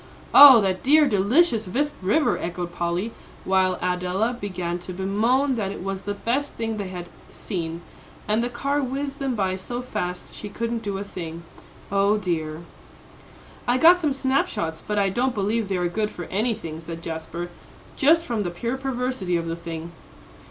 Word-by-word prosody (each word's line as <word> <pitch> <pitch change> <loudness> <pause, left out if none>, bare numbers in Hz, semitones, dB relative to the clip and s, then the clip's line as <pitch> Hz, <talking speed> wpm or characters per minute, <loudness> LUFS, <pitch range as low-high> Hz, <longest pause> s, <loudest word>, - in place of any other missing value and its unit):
"Oh, 275 -5 +11
that 190 -2 0
dear, 295 +2 +5
delicious 225 - +3
Visp 285 +10 0
River!" 215 +12 +2
echoed 175 0 -4
Polly, 175 +6 -2 0.3
while 185 -1 +2
Adela 180 +6 0
began 180 -3 -3
to 180 +1 -8
bemoan 225 +9 +1
that 200 -3 -1
it 195 - -7
was 195 0 -3
the 205 0 -4
best 255 +8 -1
thing 225 -1 -3
they 200 -2 -3
had 180 -1 -7 0.2
seen, 170 -4 -5 0.5
and 215 +2 +2
the 240 - -1
car 280 +4 -1
whizzed 275 +1 -3
them 270 -3 -1
by 190 -3 0
so 240 +6 -5
fast, 180 -7 -4
she 210 - -7
couldn't 230 +2 -3
do 200 -3 -3
a 195 - -4
thing 170 -4 -7 0.5
O 200 +1 +3
dear! 160 -5 -2 1.1
"I 245 +1 +3
got 345 +6 +7
some 300 -3 +1
snap 270 0 +1
shots, 160 -1 -4
but 210 - -1
I 200 -1 +3
don't 245 +5 0
believe 210 +2 0
they 190 -1 -1
are 175 0 +1
good 210 +4 -1
for 175 -4 -7
anything," 205 -6 -1
said 165 0 -8
Jasper, 165 +2 -5 0.4
"just 325 +3 +4
from 235 -6 -1
the 185 - -1
pure 235 +9 -3
perversity 250 -8 -1
of 165 - -3
the 165 0 -3
thing." 165 0 -7
200 Hz, 180 wpm, -24 LUFS, 180-245 Hz, 1.1 s, Oh